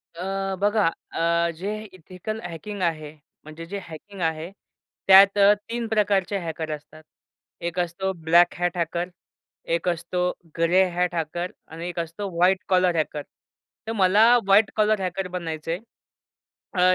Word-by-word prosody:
अ, 195 +2 -3
बघा 205 -2 +3 0.2
अ, 170 0 +1
जे 195 +5 -4 0.2
ethical 185 +5 -7
hacking 175 +4 -7
आहे, 155 -3 -1 0.3
म्हणजे 155 +2 -9
जे 200 +3 -5
हॅकिंग 180 +4 -10
आहे, 160 +1 -2 0.6
त्यात 195 +1 +8
अ, 200 +1 +7 0.2
3 235 0 -3
प्रकारचे 205 -2 +1
हॅकर 160 -1 -4
असतात. 155 +1 -16 0.6
एक 170 +1 -3
असतो 180 +2 -1
ब्लॅक 170 +1 +4
हॅट 175 0 0
हॅकर 170 +1 -2 0.7
एक 170 - -4
असतो 175 +1 -1 0.3
ग्रे 175 +3 +4
हॅट 180 0 0
हॅकर 170 +2 -3 0.2
आणि 165 +2 -7
एक 175 - -5
असतो 170 +5 -4
व्हाईट 180 +3 +4
कॉलर 180 -2 +3
हॅकर. 155 -2 -1 0.7
तर - - -1
मला 205 +3 +5 0.2
व्हाईट 200 +2 +5
कॉलर 215 -1 +2
हॅकर 185 0 -2
बनायचंय. 165 -2 -4 1.0
अ, 185 0 +4
180 Hz, 140 wpm, -24 LUFS, 165-195 Hz, 1.0 s, त्यात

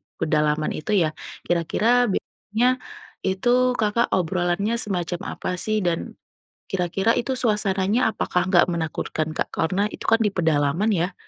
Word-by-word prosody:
pedalaman 150 0 +1
itu 155 - -4
ya? 155 - 0 0.3
Kira-kira 225 +9 +2
biasanya, 235 +5 -1 0.5
itu 190 +5 0 0.3
Kakak 225 +1 +1
obrolannya 180 +4 0
semacam 175 -5 -2 0.2
apa - - -4
sih, 215 -3 0
dan 170 -1 +1 0.7
kira-kira 190 +3 0
itu 245 +2 -1
suasananya 210 -3 +1
apakah 180 -1 0
nggak 180 -1 +4
menakutkan 160 -1 -2
Kak? - - -1
Karena 185 +4 0
itu - - -9
kan 225 - +5
di - - +4
pedalaman 160 +5 +2
ya. 180 +1 0
190 Hz, 135 wpm, -23 LUFS, 170-215 Hz, 0.7 s, kan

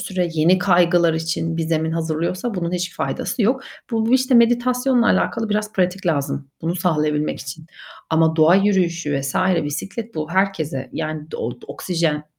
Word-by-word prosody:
süre 180 -2 -2
yeni 170 +4 +4
kaygılar 175 -2 +3
için 165 0 -2
bir 165 - -1
zemin 160 0 -1
hazırlıyorsa 165 +7 -2
bunun 170 -1 -2
hiçbir 180 0 -2
faydası 245 - -2
yok. 250 +6 +2 0.3
Bu 225 +2 +2
işte 260 0 +2
meditasyonla 245 +1 +3
alakalı 225 -1 +1
biraz 210 0 -1
pratik 185 0 -1
lazım 140 -3 -1
bunu 165 +2 -1
sağlayabilmek 150 -4 0
için 155 +4 -8 0.4
ama 160 0 +3
doğa 160 +2 +6
yürüyüşü 175 -7 +1
vs. 135 0 -4 0.3
bisiklet 200 +10 -5
bu 155 +1 -4
herkese, 160 -9 -1
yani,d 155 0 -5
o 120 - -3 0.2
oksijen 165 -4 -2
170 Hz, 150 wpm, -21 LUFS, 155-200 Hz, 0.4 s, doğa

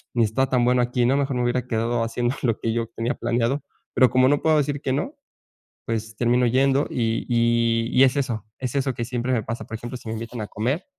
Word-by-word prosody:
ni 120 - +4
está 130 +5 +1
tan 125 -2 +2
bueno 125 0 +3
aquí, 120 0 +1
¿no?, 130 - +3
mejor 140 -2 0
me 125 - 0
hubiera 120 0 0
quedado 115 0 0
haciendo 120 +2 -1
lo 115 -4 +1
que 115 -1 -1
yo 115 -1 -1
tenía 115 +3 0
planeado", 120 +4 0 0.3
pero 130 - +5
como 130 0 +4
no 145 +1 +2
puedo 160 -1 +3
decir 145 0 -1
que 130 - -1
no, 215 - -2 0.7
pues 110 -1 -3
termino 120 +1 +2
yendo 135 +3 +2
y 115 -2 -1
y 115 -1 +2
y 130 - +5
es 130 0 +4
eso 125 -7 -2
es 130 -2 -3
eso 135 -2 0
que 120 - -4
siempre 125 +1 -2
me 115 -4 0
pasa, 115 +2 -5
por 115 - -5
ejemplo, 120 +3 -6
si 120 - -13
me 110 - -3
invitan 115 +2 -6
a 105 - -4
comer, 130 - -2
120 Hz, 240 wpm, -23 LUFS, 115-130 Hz, 0.7 s, pero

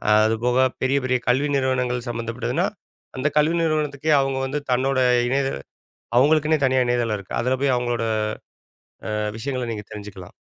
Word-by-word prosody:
அதுபோக 115 +4 +3 0.2
பெரிய, 130 +2 +2
பெரிய 130 0 +2
கல்வி 135 +4 +2
நிறுவனங்கள் 125 -2 0
சம்மந்தப்பட்டதுன்னா, 115 0 -2 0.5
அந்த 130 +3 0
கல்வி 155 +3 +3
நிறுவனத்துக்கே 155 -1 0
அவங்க 135 -1 -1
வந்து 145 +2 -3
தன்னோட 130 +1 +1 0.3
இணைய 135 +1 +1 0.7
அவங்களுக்குன்னே 155 +3 +4
தனியா 130 0 +3
இணையதளம் 120 -3 0
இருக்கு. 100 - -6
அதுல 125 +2 +1
போய் 135 -2 +3
அவங்களோட 120 -2 -1 1.3
அ 105 - -8
விஷயங்களை 125 0 -3
நீங்க 105 -2 -7
தெரிஞ்சுக்கலாம். 100 -3 -9
130 Hz, 140 wpm, -23 LUFS, 120-140 Hz, 1.3 s, அவங்களுக்குன்னே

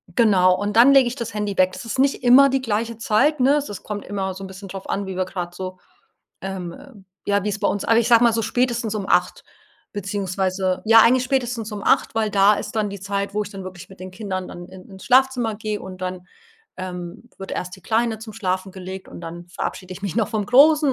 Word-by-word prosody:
genau, 185 -5 +4
und 205 +2 -3
dann 245 +4 +8
lege 265 -3 +6
ich 240 - -3
das 235 -6 -5
Handy 210 -1 -2
weg. 185 0 +4
Das - - -8
ist 230 - -4
nicht 270 -1 +1
immer 265 +3 +7
die 270 0 0
gleiche 230 -1 -2
Zeit, 260 +7 +2
ne? 270 +3 +4
Also, 290 -6 -2
es 200 - -8
kommt 210 -1 -6
immer 195 -2 -3
so 195 - -8
'n - - -6
bisschen 190 +1 -10
drauf 195 0 -8
an, 195 0 -2
wie 190 - -5
wir 185 - 0
grade 175 -2 -5
so, 185 0 -6 0.7
ähm, 190 -3 -5
äh 280 0 -14 0.3
ja, 200 -1 +1
wie's 210 0 -2
bei 200 - +2
uns 205 - -2
aber 230 0 +4
ich 235 - +1
sage 235 -1 +6
mal 235 - +5
so 225 - 0
spätestens 240 -2 -1
um 200 -2 -4
20:00 - - +1 0.5
beziehungsweise 190 -2 -2
ja, 225 +1 +8
eigentlich 250 +3 +4
spätestens 245 -4 -2
um 205 -1 -6
20:00, - - +2
weil 220 -1 0
da 200 +1 +5
ist - - -5
dann 215 -1 +1
die 200 - -7
Zeit, 200 +1 -3
wo 210 - +1
ich 205 - -8
dann 195 -2 -8
wirklich 185 0 -10
mit 190 - -15
den 185 0 -7
Kindern 185 -2 -5
dann 175 0 -9
in 185 -1 -13
ins 190 -1 -12
Schlafzimmer 250 -3 +3
gehe 215 0 -4
und 185 -1 -9
dann, 185 0 -5 0.5
ähm, 180 +4 -7
wird 195 - -7
erst 180 +1 -4
die 190 - -19
Kleine 225 0 0
zum 220 -1 -9
Schlafen 190 -3 -3
gelegt 190 0 -8
und - - -10
dann 170 +1 -8
verabschiede 185 +1 -5
ich 185 - -10
mich 200 -1 -4
noch 225 -3 +1
vom 210 -3 -2
Großen 290 +3 +5
205 Hz, 245 wpm, -22 LUFS, 185-230 Hz, 0.7 s, dann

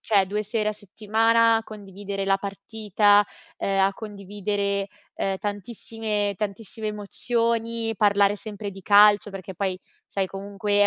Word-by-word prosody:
cioè, 200 -3 +3
2 210 +3 -2
sere 215 0 -1
a - - -4
settimana 225 +3 +2
a 225 - -1
condividere 200 -2 -6
la 195 0 +2
partita, 205 +1 +2 0.3
uhm, 195 0 0
a 195 - +2
condividere, 200 -1 -3 0.3
ehm, 195 -1 -1
tantissime 205 0 -3
tantissime 215 +2 -4
emozioni, 230 +2 -1
parlare 205 0 +4
sempre 210 -1 -6
di 195 0 -12
calcio, 205 +1 +6
perché 190 -1 -8
poi, 185 0 -2 0.3
sai, 195 -1 -1
comunque 200 +2 -4
è 205 - +6
205 Hz, 140 wpm, -25 LUFS, 195-215 Hz, 0.3 s, calcio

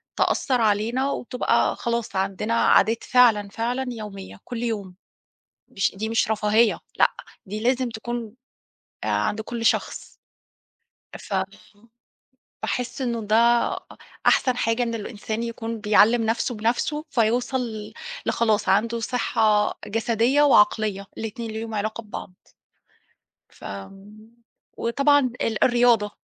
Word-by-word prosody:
تأثِّر 255 -3 +1
علينا، 225 +6 +1
وتبقى 250 0 0
خلاص، 235 -2 -3
عندنا 195 +3 -1
عادات 230 0 +3
فعلًا 225 -5 +4
فعلًا 240 +5 -2
يومية، 205 -5 -8
كل 240 -1 -5
يوم. 205 -6 -3 0.7
مش 195 - 0
دي 220 +3 -3
مش 225 -1 +1
رفاهية، 215 +1 +2 0.2
لأ، - - +5 0.4
دي 210 +3 -5
لازم 250 +2 +1
تكون، 230 -1 -5 0.7
آآ، - - -3
عند 220 - 0
كل 230 +1 -5
شخص. - - 0 1.1
فم 190 -2 -1 1.2
باحِس 245 +5 -3
إنه 235 -2 -1
ده 215 +1 +1 0.4
أ - - -3 0.5
أحسن 255 -2 +4
حاجة، 230 0 0
إن 230 -1 -1
الإنسان 220 0 -4
يكون 230 -1 -5
بيعلِّم 215 +3 +4
نفسه 230 +2 0
بنفسه، 240 +7 -1
فيوصل 240 +2 +1
ل 220 -4 -6 0.3
لخلاص، 215 -2 +1
عنده 230 +4 +2
صحة 220 -3 +1
جسدية 230 +5 +2
وعقلية، 210 -6 +3
الاتنين 225 +1 -5
ليهم 220 0 -5
علاقة 215 +2 -3
ببعض. 205 -3 -8 1.2
ف - - -18 1.1
وطبعًا 280 +5 +3 0.2
ال 220 -1 +1
الرياضة، 240 -4 +3
225 Hz, 115 wpm, -24 LUFS, 210-240 Hz, 1.2 s, لأ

